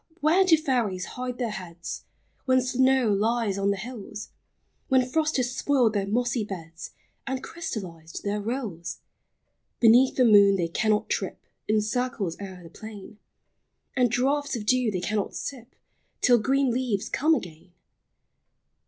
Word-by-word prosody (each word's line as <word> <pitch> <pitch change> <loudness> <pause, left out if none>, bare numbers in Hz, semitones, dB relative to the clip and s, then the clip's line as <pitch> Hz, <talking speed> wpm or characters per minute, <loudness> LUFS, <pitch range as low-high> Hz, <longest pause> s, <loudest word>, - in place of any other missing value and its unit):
where 320 +6 +4
do 345 -4 +5
fairies 240 -11 -1
hide 250 0 -4
their 240 -4 -2
heads, 175 -4 -7 0.4
When 260 -1 +4
snow 260 -1 +2
lies 215 -1 0
on 195 0 +1
the 200 - 0
hills, 210 -1 -7 0.6
When 260 -1 +3
frost 310 +3 0
has 250 -1 -1
spoiled 255 -6 +2
their 200 -2 -1
mossy 240 +2 0
beds, 165 -5 -8 0.4
And 265 -1 -3
crystallized 180 - -6
their 205 +1 -1
rills? 200 -8 -4 0.8
Beneath 240 +3 +6
the 255 - +4
moon 200 -3 +7
they 170 -3 -1
cannot 215 +4 +1
trip - - -3 0.2
In 215 0 +3
circles 215 -5 -2
o'er 190 -2 -8
the 165 - -11
plain; 215 +1 -10 0.8
And 250 -2 +3
draughts 280 +4 0
of 215 -3 -5
dew 250 0 +3
they 185 -4 -2
cannot 205 +2 -2
sip, 255 -2 -7 0.5
Till 245 -1 +5
green 270 +3 +2
leaves 235 -5 -1
come 315 +3 +2
again. 175 - -8
230 Hz, 145 wpm, -26 LUFS, 200-255 Hz, 0.8 s, moon